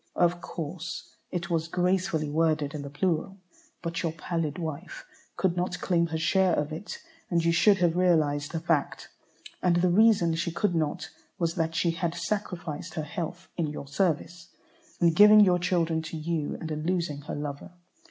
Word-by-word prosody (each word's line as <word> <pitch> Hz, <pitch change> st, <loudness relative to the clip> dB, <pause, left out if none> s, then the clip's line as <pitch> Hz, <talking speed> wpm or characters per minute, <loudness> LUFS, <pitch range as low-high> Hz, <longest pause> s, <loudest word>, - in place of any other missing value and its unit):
Of 175 Hz, 0 st, +2 dB
course 165 Hz, +1 st, -6 dB
it 175 Hz, -1 st, -4 dB
was 165 Hz, -1 st, 0 dB
gracefully 180 Hz, -2 st, 0 dB
worded 155 Hz, -1 st, +1 dB
in 150 Hz, -, -4 dB
the 140 Hz, -, -7 dB
plural, 185 Hz, +5 st, -1 dB, 0.5 s
but 170 Hz, 0 st, -2 dB
your 165 Hz, -, -1 dB
pallid 160 Hz, -1 st, -3 dB
wife 165 Hz, 0 st, -6 dB, 0.3 s
could 185 Hz, -3 st, +1 dB
not 180 Hz, +1 st, -2 dB
claim 170 Hz, -2 st, +1 dB
her 160 Hz, 0 st, -3 dB
share 185 Hz, +2 st, +3 dB
of 150 Hz, +1 st, -2 dB
it, 170 Hz, +7 st, -6 dB, 0.3 s
and 170 Hz, -2 st, +1 dB
you 170 Hz, -, +4 dB
should 195 Hz, +4 st, +5 dB
have 175 Hz, -2 st, +2 dB
realized 155 Hz, -5 st, +2 dB
the 165 Hz, -, -2 dB
fact. 160 Hz, -3 st, -1 dB, 0.5 s
And 180 Hz, -1 st, +3 dB
the 175 Hz, +1 st, +3 dB
reason 200 Hz, -4 st, +4 dB
she 165 Hz, +1 st, -1 dB
could 175 Hz, +3 st, 0 dB
not 155 Hz, -3 st, -2 dB, 0.3 s
was 170 Hz, -3 st, 0 dB
that 165 Hz, -2 st, -1 dB
she 170 Hz, +1 st, +2 dB
had 170 Hz, 0 st, -2 dB
sacrificed 175 Hz, -3 st, -4 dB
her 155 Hz, -, -2 dB
health 170 Hz, +4 st, -5 dB
in 165 Hz, -3 st, 0 dB
your 145 Hz, -1 st, -6 dB
service, 170 Hz, +1 st, -1 dB, 0.5 s
in 170 Hz, -2 st, +4 dB
giving 210 Hz, +3 st, +8 dB
your 180 Hz, -3 st, +5 dB
children 170 Hz, -2 st, +1 dB
to 160 Hz, 0 st, -6 dB
you, 155 Hz, -1 st, -2 dB
and 160 Hz, -, -5 dB
in 155 Hz, 0 st, -3 dB
losing 170 Hz, -4 st, -1 dB
her 145 Hz, -, -6 dB
lover. 145 Hz, -1 st, -5 dB
170 Hz, 180 wpm, -27 LUFS, 155-180 Hz, 0.5 s, giving